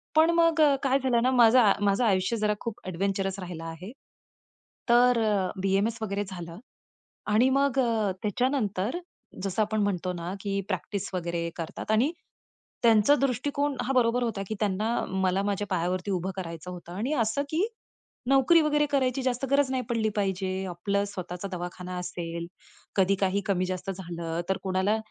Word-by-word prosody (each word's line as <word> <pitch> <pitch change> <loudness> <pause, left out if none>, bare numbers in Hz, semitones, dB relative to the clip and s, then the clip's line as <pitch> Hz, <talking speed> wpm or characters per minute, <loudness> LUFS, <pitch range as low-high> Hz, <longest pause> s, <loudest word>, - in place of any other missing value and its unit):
पण 320 +2 +6
मग 330 -1 +3 0.2
काय 270 0 +3
झालं 250 -3 +2
ना, 255 - +3
माझं, 235 -3 +6
माझं 200 +4 +2
आयुष्य 195 +2 +1
जरा 210 0 +1
खूप 230 -3 -5
एडव्हेंचरस 195 +1 -1
राहिलं 175 -3 -6
आहे. 165 +5 -7 1.0
तर 240 0 +5 0.4
बी-एम-एस 195 +4 +1
वगैरे 205 -1 -1
झालं 175 -1 -8 0.7
आणि 245 +5 +5
मग 275 0 +2 0.4
त्याच्यानंतर 225 - 0 0.4
जसं 195 +2 0
आपण 215 0 0
म्हणतो 185 -2 -1
ना, 175 +1 -5
की 200 -1 -1
प्रॅक्टिस 190 +2 -3
वगैरे 170 -1 -2
करतात 165 +5 -5
आणि 240 +8 +3 0.7
त्यांचा 225 +4 +6
दृष्टिकोन 280 +2 0
हां 270 +2 -1
बरोबर 245 0 +3
होता 225 -4 -2
की 215 - -3
त्यांना 210 +2 0 0.2
मला 190 0 +1
माझ्या 205 0 -1
पायावरती 180 +3 -1
उभं 185 +1 -1
करायचं 170 0 -6
होतं 175 -1 -9
आणि 230 +10 -2
असं 225 +6 -1
की 335 +6 +1 0.6
नोकरी 275 +5 +5
वगैरे 295 -1 +2
करायची 265 -2 +1
जास्त 255 0 0
गरज 280 -1 +3
नाही 255 -1 -1
पडली 225 -2 +1
पाहिजे. 190 -1 -1
आपलं 200 +3 -1
स्वतःचा 185 -1 -6
दवाखाना 180 0 -5
असेल, 170 -1 -5 0.5
कधी 195 0 +4
काही 195 +1 +2
कमी 185 -2 +1
जास्त 185 +1 -3
झालं 170 -3 -4
तर 190 - +1
कोणाला, 190 +3 +1
200 Hz, 155 wpm, -27 LUFS, 185-245 Hz, 1.0 s, पण